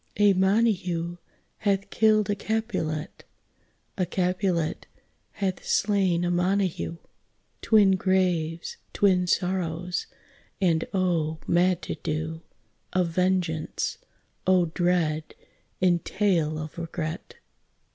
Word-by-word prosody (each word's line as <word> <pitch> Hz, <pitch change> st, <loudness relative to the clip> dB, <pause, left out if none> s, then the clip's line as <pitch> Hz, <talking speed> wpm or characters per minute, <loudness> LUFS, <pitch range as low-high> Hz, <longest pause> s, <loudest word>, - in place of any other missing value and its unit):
A 205 Hz, -1 st, +5 dB
Montague 185 Hz, -4 st, +1 dB, 0.4 s
hath 200 Hz, -1 st, 0 dB
killed 215 Hz, -2 st, +3 dB
a 205 Hz, -, +1 dB
Capulet, 205 Hz, -8 st, -3 dB, 0.8 s
A 185 Hz, -, +2 dB
Capulet 180 Hz, -2 st, -1 dB, 0.5 s
hath 190 Hz, -3 st, -2 dB
slain 190 Hz, -4 st, +2 dB
a 175 Hz, -, 0 dB
Montague, 180 Hz, -1 st, 0 dB, 0.6 s
Twin 210 Hz, -3 st, +5 dB
graves, 175 Hz, -3 st, 0 dB, 0.2 s
twin 185 Hz, -3 st, +3 dB
sorrows, 180 Hz, -1 st, -1 dB, 0.5 s
and 170 Hz, -4 st, +2 dB
oh, 170 Hz, -5 st, 0 dB
mad 180 Hz, +1 st, +2 dB
to -, -, -3 dB
do 160 Hz, +1 st, -3 dB, 0.5 s
Of 180 Hz, -2 st, +2 dB
vengeance! 180 Hz, -3 st, -1 dB, 0.5 s
oh, 180 Hz, -3 st, +3 dB
dread 170 Hz, -4 st, 0 dB, 0.5 s
entail 175 Hz, -3 st, +2 dB
of 155 Hz, +2 st, -6 dB
regret! 165 Hz, 0 st, -5 dB
180 Hz, 95 wpm, -26 LUFS, 165-195 Hz, 0.8 s, A